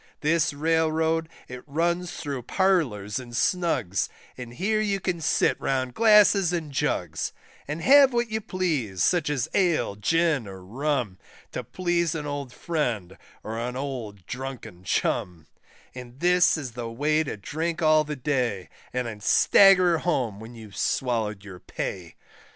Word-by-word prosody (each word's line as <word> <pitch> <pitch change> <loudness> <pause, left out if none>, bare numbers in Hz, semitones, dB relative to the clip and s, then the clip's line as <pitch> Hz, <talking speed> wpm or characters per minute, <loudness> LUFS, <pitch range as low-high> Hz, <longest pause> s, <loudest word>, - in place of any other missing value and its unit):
This 160 +1 +2
Railroad 160 +1 +1 0.2
it 125 0 -8
runs 170 +4 -1
thro' 140 -6 -5
Parlours 125 - 0
and 120 -2 -9
Snugs, 130 - 0 0.3
And 120 -1 -9
here 215 - 0
you 200 -2 0
can 180 -3 -2
sit 160 - +1
round 130 -2 -1
glasses 210 - +5
and 165 -4 -3
jugs, 90 - -2 0.3
And 150 +3 -4
have 275 0 +7
what 235 -2 -1
you 220 0 -1
please, 150 - -1
such 175 -5 +2
as 135 -5 -1
Ale, 170 - +1
Gin, 155 +2 +1
or 95 -1 -10
Rum, 125 -3 -2 0.3
To - - -4
please 175 -3 -1
an 150 -2 -4
old 145 -3 -4
friend, 120 - -3 0.3
or 110 +1 -5
an 125 +1 -3
old 120 -9 -5
drunken 125 -8 -7
chum; 90 -3 -1 0.5
And 125 0 -10
this 180 0 +4
is 135 -5 -5
the 115 0 -6
way 150 +6 +1
to 135 - -5
drink 160 - -3
all 155 0 +5
the 150 0 -5
day, 125 - -1 0.2
And 125 0 -2
then 110 -3 -6
stagger 180 - +5
home 125 - -1
when 115 +2 -10
you've 110 -4 -12
swallowed 110 -6 -1
your 95 -3 -10
pay. 90 -1 -6
145 Hz, 150 wpm, -25 LUFS, 115-170 Hz, 0.5 s, have